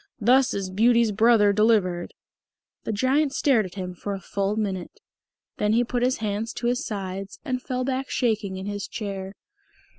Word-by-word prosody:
"Thus 250 +3 +4
is 195 -2 -3
Beauty's 230 +2 +4
brother 215 -1 +4
delivered!" 200 -5 +2 0.7
The - - -1
Giant 270 +6 +1
stared 235 -9 +3
at 180 - -14
him 180 -2 -5
for 200 +3 -4
a - - -6
full 195 +2 -2
minute. 195 -4 -3 0.6
Then 210 0 +1
he 235 +2 +4
put 245 0 -2
his 255 +1 +2
hands 215 +1 -3
to 240 - -5
his 245 +1 +1
sides 195 -2 -5
and 255 -3 -2
fell 255 0 -2
back 265 +1 -2
shaking 215 -6 0
in 190 - -6
his 205 0 -4
chair. 195 -2 -5
215 Hz, 175 wpm, -25 LUFS, 195-245 Hz, 0.7 s, Thus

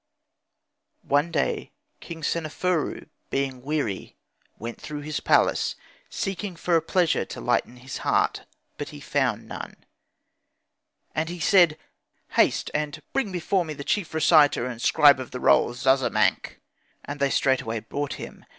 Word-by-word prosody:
One 145 +4 +2
day 150 -4 -1 0.3
King 165 -2 -9
Seneferu, 165 +2 -1 0.2
being 135 -2 -2
weary, 135 -8 -3 0.4
went 115 +1 -7
throughout 150 -1 -6
his 155 -1 -2
palace - - +2 0.3
seeking 195 -1 -4
for 170 +1 0
a 165 - +4
pleasure 175 +1 +1
to - - -8
lighten 125 - 0
his 130 +2 -7
heart, - - 0 0.3
but 145 - -4
he 150 -2 -10
found 135 -6 -1
none. - - -7 1.4
And 155 +1 -1
he 175 0 -6
said, 170 -3 +5 0.5
'Haste, - - +2
and 150 -1 -2
bring 250 -7 0
before 180 +1 0
me 155 -2 -6
the 140 - -7
chief 195 +3 -1
reciter 155 -5 +5
and 120 -2 -6
scribe 145 0 +6
of 130 - -6
the 125 - -6
rolls 120 0 +3
Zazamankh'; 130 0 +2 0.5
and 145 +1 -6
they 140 0 +2
straightway 130 -5 +1
brought 140 +5 -4
him. - - -9
145 Hz, 140 wpm, -25 LUFS, 130-165 Hz, 1.4 s, scribe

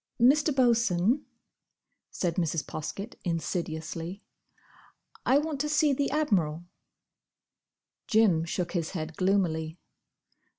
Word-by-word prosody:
"Mr. 285 +6 +5
Bosun," 235 - +2 0.8
said 175 -3 -1
Mrs. 165 -4 0
Poskett, 200 +8 -6
insidiously, 165 +1 -3 1.0
"I 265 - +6
want 295 -2 -1
to 300 - -1
see 300 -1 +3
the 280 +1 0
Admiral." 175 - 0 1.4
Jim 215 -9 +4
shook 170 +1 -3
his 170 -2 -2
head 155 0 -5
gloomily. 175 -4 0
185 Hz, 95 wpm, -28 LUFS, 165-260 Hz, 1.4 s, I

